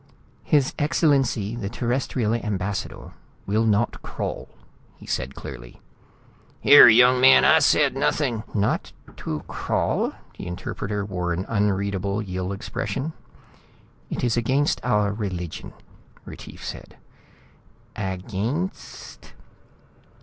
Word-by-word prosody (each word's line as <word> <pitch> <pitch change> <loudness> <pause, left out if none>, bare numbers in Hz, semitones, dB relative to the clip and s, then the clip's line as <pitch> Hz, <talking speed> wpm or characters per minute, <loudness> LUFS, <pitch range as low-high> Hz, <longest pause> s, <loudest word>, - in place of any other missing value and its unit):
"His 145 -4 +2
Excellency 135 - +1
the 105 -5 -4
Terrestrial 120 -1 -1
Ambassador 105 -4 -3 0.3
will 110 +3 +1
not 105 +1 +1
crawl," - - -5 0.5
he - - -14
said 65 +1 -3
clearly. - - -10 0.8
"Here, 145 - +9
young 125 +2 +6
man! 130 +1 +7
I 160 - +6
said 145 -2 +3
nothing 130 -4 0
" - - -22
"Not 105 0 0 0.2
to 75 -1 -4
crawl?" - - -1 0.3
The - - -6
interpreter 100 +3 -4
wore 90 -3 -2
an 90 +3 -3
unreadable 100 -1 0
Yill 95 -2 -4
expression. 135 +9 -4 1.0
"It - - -4
is 120 -3 +1
against 130 +5 +1
our 105 -4 +1
religion," 90 -6 -5 0.5
Retief - - -10
said. - - -8 1.0
"Againsst?" 105 - -5
105 Hz, 105 wpm, -24 LUFS, 95-130 Hz, 1.0 s, Here